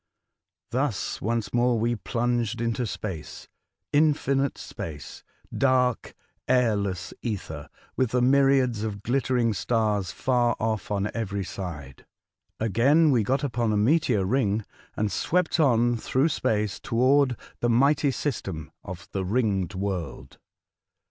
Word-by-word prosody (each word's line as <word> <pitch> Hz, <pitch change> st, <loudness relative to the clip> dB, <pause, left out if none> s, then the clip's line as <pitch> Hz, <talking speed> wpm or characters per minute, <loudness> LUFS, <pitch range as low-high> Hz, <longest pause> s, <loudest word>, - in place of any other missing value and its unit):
Thus 130 Hz, -4 st, -1 dB
once 115 Hz, +1 st, -2 dB
more 120 Hz, 0 st, +3 dB
we 120 Hz, +2 st, +1 dB
plunged 120 Hz, -1 st, -1 dB
into 115 Hz, +1 st, -1 dB
space 95 Hz, -6 st, -6 dB, 0.2 s
— -, -, -58 dB
infinite 140 Hz, -2 st, +2 dB
space, 80 Hz, -7 st, -8 dB, 0.2 s
— -, -, -22 dB
dark^ 130 Hz, -3 st, +1 dB, 0.3 s
airless 100 Hz, -7 st, +1 dB
ether, 95 Hz, -10 st, -5 dB, 0.3 s
with 130 Hz, -3 st, +1 dB
the 125 Hz, +2 st, +1 dB
myriads 135 Hz, -3 st, +3 dB
of 105 Hz, -2 st, -4 dB
glittering 125 Hz, -2 st, +1 dB
stars 105 Hz, -3 st, 0 dB
far 120 Hz, +2 st, +1 dB
off 110 Hz, -3 st, -2 dB
on 105 Hz, 0 st, -1 dB
every 100 Hz, -3 st, -2 dB
side. 80 Hz, -9 st, -7 dB, 0.5 s
Again 135 Hz, -, +4 dB
we 120 Hz, -4 st, +3 dB
got 135 Hz, +6 st, 0 dB
upon 120 Hz, -4 st, 0 dB
a 105 Hz, -, +1 dB
meteor 115 Hz, -, +2 dB
ring, 110 Hz, -2 st, +1 dB, 0.3 s
and 105 Hz, -1 st, 0 dB
swept 175 Hz, -, 0 dB
on 120 Hz, -5 st, +3 dB
through 130 Hz, +7 st, +1 dB
space 105 Hz, -7 st, -1 dB
toward 130 Hz, +2 st, +2 dB, 0.2 s
the 120 Hz, -, +1 dB
mighty 140 Hz, +4 st, +3 dB
system 95 Hz, -, -4 dB
of 90 Hz, -3 st, -8 dB
the 95 Hz, -, -2 dB
Ringed 100 Hz, -2 st, 0 dB
World. 95 Hz, -3 st, -4 dB
115 Hz, 130 wpm, -26 LUFS, 100-130 Hz, 0.5 s, Again